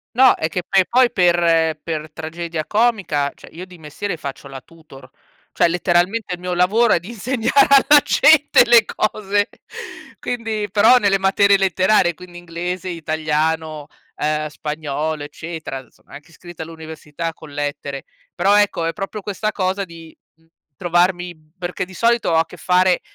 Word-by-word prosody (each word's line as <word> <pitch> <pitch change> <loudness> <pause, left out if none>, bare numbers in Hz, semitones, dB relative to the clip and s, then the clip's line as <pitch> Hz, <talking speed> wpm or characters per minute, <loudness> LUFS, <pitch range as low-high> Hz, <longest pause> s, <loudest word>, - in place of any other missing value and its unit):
No, 260 0 +6
è 155 - -2
che 180 +2 -3
poi 190 -1 +3
poi 250 0 +4
per 170 -4 +2
per 155 -1 -5
tragedia 160 0 -5
comica, 200 -11 0
cioè, - - -16
io 175 +3 -9
di 180 -1 -15
mestiere 160 +4 -6
faccio 140 -1 -8
la 135 - -8
tutor. 135 -3 -17 0.4
Cioè, - - +3
letteralmente 180 +4 0
il 175 - -6
mio 180 0 -3
lavoro 210 +6 +3
è - - +2
di 180 - -12
insegnare 245 +4 +1 0.2
alla 295 0 +8
gente 290 -4 +5
le 235 -2 +6
cose, 205 -1 -1 0.7
quindi 225 -3 -3
però 220 +5 +5
nelle 200 -4 +2
materie 200 +1 +3
letterarie, 185 -1 +2
quindi 175 +1 -12
inglese, 175 +1 -5
italiano, 155 -2 -2 0.3
uhm, 155 0 -1
spagnolo, 150 0 -4
eccetera. 145 -3 -8
Sono - - -27
anche 150 +4 -13
iscritta 175 0 -10
all'università 160 0 -7
con 155 -2 -14
lettere, 145 -1 -4 0.3
però, 200 +1 +3
ecco, 205 -5 +1
è 165 - 0
proprio 205 +1 -6
questa 210 +2 -3
cosa 190 +1 -1
di, 165 -2 -13 0.2
mhmm, 165 0 -32 0.3
trovarmi 175 -1 -1
perché 180 0 -4
di 185 - -15
solito 235 -3 +1
ho - - +2
a 160 0 +3
che - - -13
fare 180 0 +2
175 Hz, 160 wpm, -19 LUFS, 160-200 Hz, 0.7 s, alla